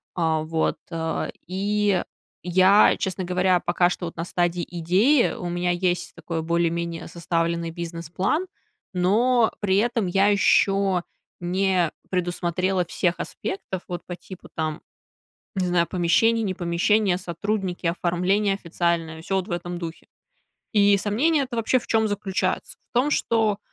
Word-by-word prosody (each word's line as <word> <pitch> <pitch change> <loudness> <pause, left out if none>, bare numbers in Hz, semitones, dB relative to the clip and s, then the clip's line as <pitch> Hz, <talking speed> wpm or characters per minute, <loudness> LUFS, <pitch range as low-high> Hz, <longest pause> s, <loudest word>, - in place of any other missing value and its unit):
А, 160 -2 +1
вот, 160 0 0
а. 160 0 -2 0.2
И 200 0 +1 0.4
я, 185 +3 +5
честно 185 0 -2
говоря, 180 0 +2
пока 175 +1 +2
что 180 - -4
вот 165 - -6
на 165 - -3
стадии 175 -1 0
идеи, 190 - +3
у 175 - -5
меня 175 0 0
есть 175 0 -1
такой 165 -2 -4
более-менее 170 0 -1
составленный 170 0 -1
бизнес-план, 170 - -2 0.5
но 225 +6 +3
при 195 -2 +2
этом 230 -1 +1
я 195 +3 +3
еще 195 -2 +3 0.4
не 180 -1 +1 0.2
предусмотрела 180 0 0
всех 175 0 -1
аспектов. 190 -1 -5
Вот 175 -1 -4
по 175 - -6
типу, 180 +1 -12
там, 155 -1 -3 0.7
не 185 -2 0
знаю, 170 -1 +2
помещение, 225 +6 +2
не 195 -3 -1
помещение, 180 +3 +1
сотрудники, 185 +1 -3
оформление 180 +4 +1
официальное, 170 -3 -2
всё 195 +4 -2
вот 185 - -2
в - - -8
этом 175 0 -3
духе. 165 -1 -7 0.7
И 205 -1 +5
сомнение 275 +10 +2
это 250 -2 -6
вообще 230 +3 +2
в - - -11
чем 220 -1 +2
заключается? 205 -2 -2
В - - -88
том, 255 +5 +3
что 220 -7 +1
180 Hz, 140 wpm, -24 LUFS, 170-200 Hz, 0.7 s, я